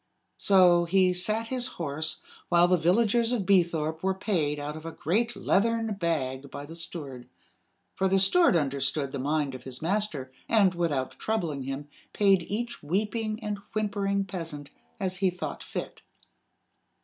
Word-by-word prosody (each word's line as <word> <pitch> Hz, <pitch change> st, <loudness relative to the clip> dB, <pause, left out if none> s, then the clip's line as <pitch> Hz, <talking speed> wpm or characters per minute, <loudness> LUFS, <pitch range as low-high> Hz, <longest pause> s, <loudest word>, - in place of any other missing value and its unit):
So 180 Hz, -3 st, +5 dB
he 185 Hz, +1 st, +3 dB
sat 215 Hz, +5 st, 0 dB
his 255 Hz, -1 st, -1 dB
horse, 155 Hz, 0 st, -2 dB, 0.3 s
while 175 Hz, 0 st, +5 dB
the 180 Hz, -, +4 dB
villagers 225 Hz, +7 st, +2 dB
of 225 Hz, -6 st, 0 dB
Beethorpe 165 Hz, -4 st, +2 dB
were 190 Hz, 0 st, 0 dB
paid 170 Hz, -7 st, 0 dB
out 145 Hz, +1 st, -5 dB
of 155 Hz, -, -9 dB
a 165 Hz, -, -5 dB
great 220 Hz, +10 st, 0 dB
leathern 225 Hz, +3 st, +1 dB
bag 140 Hz, -7 st, -2 dB
by 145 Hz, -, -7 dB
the 165 Hz, +3 st, -10 dB
steward 140 Hz, -7 st, -7 dB, 0.6 s
for 190 Hz, -, +1 dB
the 190 Hz, +1 st, +3 dB
steward 195 Hz, -, +5 dB
understood 140 Hz, -2 st, 0 dB
the 140 Hz, -, -4 dB
mind 145 Hz, 0 st, 0 dB
of 130 Hz, -, -8 dB
his 130 Hz, 0 st, -7 dB
master, 165 Hz, -7 st, -1 dB, 0.2 s
and, 200 Hz, -5 st, +4 dB
without 150 Hz, -7 st, -2 dB
troubling 170 Hz, -11 st, -1 dB
him, 135 Hz, +2 st, -5 dB, 0.3 s
paid 195 Hz, -3 st, +4 dB
each 235 Hz, +4 st, -3 dB
weeping 215 Hz, +7 st, -2 dB
and 210 Hz, -1 st, -3 dB
whimpering 200 Hz, -2 st, 0 dB
peasant 165 Hz, -6 st, -6 dB, 0.3 s
as 185 Hz, -1 st, -2 dB
he 190 Hz, 0 st, +2 dB
thought 180 Hz, 0 st, -5 dB
fit. -, -, -6 dB
180 Hz, 155 wpm, -28 LUFS, 150-205 Hz, 0.6 s, So